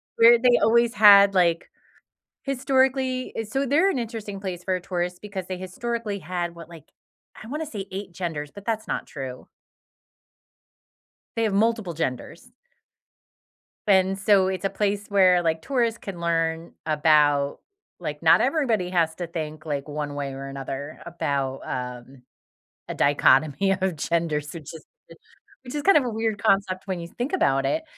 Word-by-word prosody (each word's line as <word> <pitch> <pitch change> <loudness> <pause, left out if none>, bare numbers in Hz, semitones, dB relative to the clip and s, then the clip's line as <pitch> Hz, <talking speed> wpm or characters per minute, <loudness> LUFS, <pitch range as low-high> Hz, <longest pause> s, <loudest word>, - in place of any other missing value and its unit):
Where 230 +1 +7
they 245 0 +4
always 235 +1 +3
had, 200 -2 +8
like, 170 -2 +2 0.7
historically 265 -1 0 0.2
So 270 +4 -1
they're 325 +9 +3
an 260 - -2
interesting 220 -4 -6
place 185 -3 -5
for 185 - -1
a 180 - -4
tourist 180 0 -3
because 200 -3 -6
they 185 -1 -5
historically 215 +3 -4
had, 175 0 -4
what, 165 -2 -11
like, 165 -3 -13 0.6
I - - -10
wanna 300 +4 -4
say 205 -8 -6
8 195 -1 -6
genders, 160 -4 -4
but 200 +7 -12
that's 220 -1 -2
not - - -3
true. 130 -2 -8 1.9
They 230 - 0
have 215 -3 0
multiple 220 -3 +1
genders. 165 - -5 1.3
And 190 -1 +3
so 195 -1 +3
it's 190 0 -3
a 195 - +2
place 205 0 -1
where, 185 -3 +5
like, 160 -1 0
tourists 235 -4 0
can 190 -4 -8
learn 165 0 -1
about 150 -2 +3 0.4
like, - - -5
not - - +6
everybody 230 - +1
has 165 -3 +1
to 175 0 -5
think, 155 -2 -6
like, 145 -2 -3
one 145 -1 -4
way 140 -1 -4
or 135 +1 -7
another 135 +2 -6
about, 140 -5 -2
um, 125 0 -6 0.7
a - - -4
dichotomy 145 +5 +3
of 190 -3 -1
genders, 150 -2 -1
which 165 -2 -9
is 160 - -11 0.8
which 250 +1 -9
is 295 - -1
kind 395 -4 +6
of 285 - +3
a 245 - -1
weird 220 -1 -2
concept 195 -2 +1
when 185 -2 -3
you 170 - -7
think 245 - -4
about 135 - +2
it. 315 - 0
185 Hz, 160 wpm, -24 LUFS, 155-225 Hz, 1.9 s, had